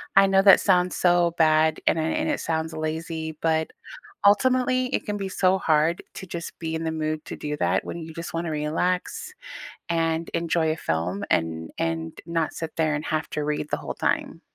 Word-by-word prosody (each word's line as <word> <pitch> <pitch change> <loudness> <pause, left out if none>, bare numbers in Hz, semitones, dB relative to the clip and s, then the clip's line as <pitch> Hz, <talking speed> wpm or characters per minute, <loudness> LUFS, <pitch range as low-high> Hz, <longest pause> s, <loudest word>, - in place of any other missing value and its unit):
I 195 0 +8
know 195 0 +4
that 195 0 +8
sounds 180 -2 +2
so 175 -1 +3
bad, 155 0 +3
and 165 - +3
it 160 +1 0
and - - 0
it - - 0
sounds 160 0 -2
lazy, 160 0 -4
but, 160 -1 +1 0.6
ultimately, 255 +4 +3
it 255 - -2
can 205 0 -2
be 195 -1 -4
so 185 0 +2
hard 160 +1 +2
to - - -7
just 170 -2 -7
be 160 -1 -4
in 160 0 -2
the 160 - -1
mood 155 -1 -2
to - - -6
do 150 0 -4
that - - +1
when - - -5
you 160 0 -8
just 165 +1 -6
wanna 165 0 -2
relax 180 - -1 0.6
and 165 0 0
enjoy 165 -1 +1
a - - -3
film 90 - -2
and 80 0 0
and 80 0 -2
not 165 -2 -1
sit 160 -1 -5
there 155 -2 +1
and 150 +1 -3
have 155 0 -1
to 150 - -2
read 150 0 -2
the - - +1
whole - - -5
time. - - -1
160 Hz, 200 wpm, -25 LUFS, 155-175 Hz, 0.6 s, I